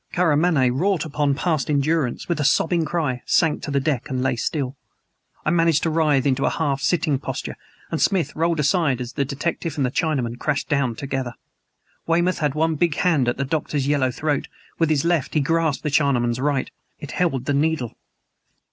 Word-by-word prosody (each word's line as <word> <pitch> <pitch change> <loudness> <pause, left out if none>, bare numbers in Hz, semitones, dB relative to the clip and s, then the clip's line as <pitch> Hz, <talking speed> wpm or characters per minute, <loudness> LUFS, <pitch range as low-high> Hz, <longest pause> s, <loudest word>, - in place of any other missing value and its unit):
Karamaneh, 160 -6 +3
wrought 175 +5 0
upon 145 -2 0
past 155 -4 -1
endurance, 145 -2 0
with 170 -3 -1
a - - +1
sobbing 160 +4 +2
cry, 150 -8 -1
sank 160 -3 +2
to - - -5
the 140 -1 +1
deck 140 -1 -1
and 130 -2 -1
lay 135 - +1
still. 135 +2 -2 0.7
I 155 - +2
managed 165 -3 +3
to 165 - +1
writhe 150 -4 +2
into 135 -2 +1
a - - +3
half 140 -4 -1
sitting 150 -2 +1
posture, - - -5 0.4
and - - -1
Smith 175 -7 +1
rolled 165 0 +1
aside 150 -3 +2
as 125 -1 -6
the 140 - 0
detective 155 +3 -3
and 140 - +1
the 125 - -1
Chinaman 130 -7 -1
crashed 150 -2 -1
down 140 -6 0
together. 135 -2 -4 0.7
Weymouth 175 +2 +2
had 150 -3 0
one 160 0 +1
big 165 -1 +1
hand 155 -9 +2
at 120 - 0
the 140 - -1
Doctor's 145 -1 -1
yellow 140 -3 +2
throat; 145 +3 -2 0.3
with 165 -2 +2
his 155 -1 +1
left 170 -5 0
he - - +4
grasped 160 0 0
the 150 - -1
Chinaman's 125 -5 +2
right. 140 -1 0 0.3
It 145 - -8
held 135 -8 0
the 145 - 0
needle. 145 -4 0
145 Hz, 190 wpm, -22 LUFS, 135-165 Hz, 0.7 s, he